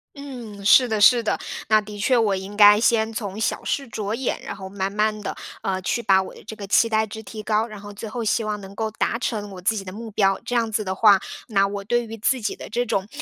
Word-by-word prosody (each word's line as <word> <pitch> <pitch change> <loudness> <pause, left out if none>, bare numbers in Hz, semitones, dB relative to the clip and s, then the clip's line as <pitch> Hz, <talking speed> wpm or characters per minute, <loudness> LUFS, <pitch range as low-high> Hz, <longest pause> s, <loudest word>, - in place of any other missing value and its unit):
嗯， 240 -8 -9
是 250 +4 +6
的 220 -1 0
是 235 +3 +6
的。 215 - -1 0.3
那 215 0 +6
的 210 0 -8
确 245 +5 +2
我 215 -4 +2
应 190 +2 -7
该 205 0 +8
先 225 -1 +2
从 205 -2 -5
小 220 - -1
事 275 -2 -2
着 215 -2 -4
眼， 255 +2 -2
然 - - -5
后 190 -1 -8
慢 195 0 -3
慢 215 +1 0
地， - - -4 0.3
呃， 190 -1 -2
去 235 +6 -1
把 195 -3 +4
我 190 - -8
的 - - -14
这 220 - -8
个 205 -2 -8
期 230 +3 +4
待 220 0 +1
值 220 +1 -8
提 215 +1 -8
高， 215 +1 +1
然 215 -3 -10
后 205 0 -10
最 210 +2 -7
后 235 +3 -4
希 225 +1 +1
望 210 -1 -3
能 195 0 -11
够 220 0 -2
达 225 - -1
成 215 -4 -3
我 185 -1 -9
自 185 - +2
己 195 - -5
的 185 - -7
目 225 +2 -8
标。 195 -1 +2
这 - - -5
样 230 -2 +1
子 215 0 -1
的 190 -1 -2
话， 205 +1 +6 0.3
那 195 -3 +3
我 200 0 -4
对 240 +2 +1
于 225 0 -8
自 250 +4 +1
己 210 - -2
的 - - -8
这 240 +3 -1
种 200 -4 -1
215 Hz, 290 characters per minute, -23 LUFS, 200-225 Hz, 0.3 s, 该